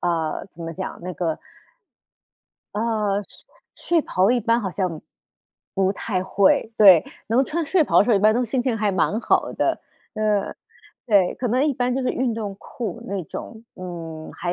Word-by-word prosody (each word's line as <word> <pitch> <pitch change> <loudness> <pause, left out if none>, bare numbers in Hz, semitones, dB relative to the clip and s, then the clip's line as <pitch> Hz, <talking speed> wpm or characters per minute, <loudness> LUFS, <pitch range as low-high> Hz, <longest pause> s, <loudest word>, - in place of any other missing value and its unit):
啊， 165 -3 -1
怎 175 -3 -18
么 165 - -5
讲， 190 +3 -6
那 180 +1 -5
个 165 -2 -2 1.4
呃， 210 -2 0
睡 - - -16 0.5
睡 - - +2
袍 190 -2 +2
一 250 - +3
般 230 +1 +2
好 195 -4 -3
像， 180 -4 -2 0.7
不 190 0 +2
太 195 -3 -2
会， 195 +3 +2
对， 190 -6 +8 0.2
能 245 +5 +3
穿 330 +4 -2
睡 335 +2 +3
袍 - - +3
的 - - +6
时 245 - 0
候 220 - +5
一 - - +3
般 215 +2 +4
都 250 +1 +1
心 245 +2 -1
情 245 -3 0
还 210 -1 +1
蛮 190 +4 +1
好 - - +1
的。 - - 0 0.3
嗯， 210 -2 0 0.5
对， 200 -5 +3
可 250 - -3
能 255 +5 +2
一 300 - +2
般 245 0 0
就 265 - 0
是 255 - 0
运 255 -2 0
动 210 -3 -4
裤 215 -5 -6
那 195 -1 -3
种， 225 +8 -8
嗯， 165 -3 -7
还 175 0 -3
205 Hz, 200 characters per minute, -23 LUFS, 185-235 Hz, 1.4 s, 对